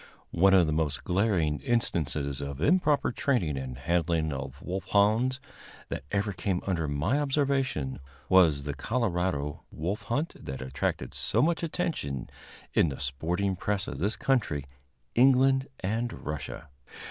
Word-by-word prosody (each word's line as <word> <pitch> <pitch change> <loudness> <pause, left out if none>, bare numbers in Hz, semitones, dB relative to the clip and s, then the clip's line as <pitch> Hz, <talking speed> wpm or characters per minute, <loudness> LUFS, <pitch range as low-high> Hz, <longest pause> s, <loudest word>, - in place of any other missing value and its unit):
One 95 +3 +5
of 90 -2 +6
the 80 - 0
most 75 -3 0
glaring 90 -6 +1
instances 70 - 0
of 70 -1 -5
improper 150 - +3
training 120 - 0
and 65 -2 -5
handling 80 +2 0
of 70 0 -6
wolfhounds 105 +7 +2 0.5
that 70 - -4
ever 100 0 0
came 90 0 -1
under 85 -5 0
my 75 - +1
observation 135 - 0 0.3
was 85 -7 +5
the 70 0 -3
Colorado 90 - -1
wolf 90 +7 -3
hunt 145 +8 0
that 65 0 -5
attracted 65 +1 -2
so 110 - 0
much 170 +2 +1
attention 160 - -3 0.4
in 85 - +4
the 70 - -6
sporting 85 +8 -1
press 100 +1 -2
of - - -5
this 105 +4 0
country, 105 - 0 0.5
England 135 +2 +5 0.2
and 115 +5 -1
Russia. 75 0 -5
90 Hz, 135 wpm, -28 LUFS, 75-120 Hz, 0.5 s, of